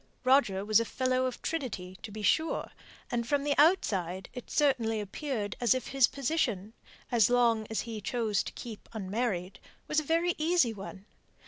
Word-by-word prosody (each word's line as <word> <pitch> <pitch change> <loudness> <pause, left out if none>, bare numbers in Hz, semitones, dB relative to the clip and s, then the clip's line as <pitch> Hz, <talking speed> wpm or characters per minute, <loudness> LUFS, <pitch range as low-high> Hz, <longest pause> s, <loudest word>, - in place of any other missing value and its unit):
Roger 255 -7 +3
was 215 +1 +5
Fellow 255 +2 0
of 255 - -7
Trinity, 215 - -4
to - - -7
be 210 +1 -7
sure; 315 - +1 0.4
and 235 -1 -1
from 285 +1 +1
the 290 0 +2
outside 190 - +2
it 250 - -8
certainly 245 -7 +2
appeared 210 0 -4
as 240 +1 +4
if 255 - -4
his 270 -3 +4
position, 240 - -1 0.4
as 235 -4 +4
long 235 -3 +3
as 220 - -1
he 225 -3 -6
chose 220 -2 0
to - - -6
keep 230 -4 -9
unmarried, 195 -3 -2 0.3
was 305 - +2
a - - -4
very 335 +3 +1
easy 315 -7 +3
one. 195 -1 -9
235 Hz, 165 wpm, -30 LUFS, 205-275 Hz, 0.4 s, was